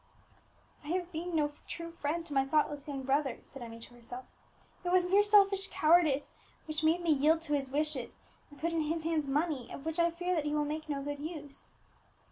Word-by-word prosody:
"I - - -11
have 355 +2 -1
been 340 +2 -3
no 295 -2 +2 0.2
true 335 0 -5
friend 330 +1 -2
to 305 - -5
my 270 -1 +4
thoughtless 295 0 0
young 275 -2 -4
brother," 270 0 +1
said 270 - -11
Emmie 230 -1 -7
to 240 - -12
herself; 240 +1 -8 0.6
"it 355 - -1
was 365 -1 +5
mere 390 +3 +6
selfish 400 -2 +5
cowardice 310 -3 +3 0.3
which 310 0 -3
made 325 +3 +3
me 340 -2 +2
yield 310 +3 +4
to 310 -2 -2
his 275 -2 0
wishes, 300 +3 -1 0.3
and 290 - -15
put 335 +1 -1
in 330 - +1
his 315 +1 -1
hands 320 -3 0
money 285 -3 -1
of 275 - -8
which 320 +1 -2
I 340 0 +5
fear 355 +2 -2
that 315 -4 0
he 295 0 0
will 295 0 +1
make 310 +1 -4
no 280 -1 -2
good 290 0 -4
use." 295 -2 -5
310 Hz, 215 wpm, -32 LUFS, 285-335 Hz, 0.6 s, mere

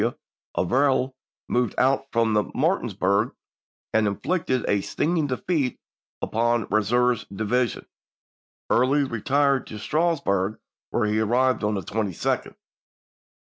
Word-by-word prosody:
W. - - 0 0.4
Averill, 130 +4 +2 0.3
moved 120 -3 0
out 135 +1 +2
from 115 -1 +2 0.2
Mar - - +2
tinsburg 100 +5 0 0.6
and 110 -1 +3
inflicted 130 - -1
a 100 -1 +2
stinging 160 - 0
defeat 135 0 -1 0.4
upon 120 +1 +1
Eam 110 - +4
seur's 120 +1 +2
division; 110 +5 -1 0.9
Early 135 +4 +3
retired 135 +3 +1
to 110 - -7
Strasburg, 110 - 0 0.3
where 120 - 0
he 105 +1 +1
arrived 125 +3 +2
on 105 0 +1
the 95 - -2
22d. 100 0 -2
120 Hz, 115 wpm, -24 LUFS, 105-135 Hz, 0.9 s, Eam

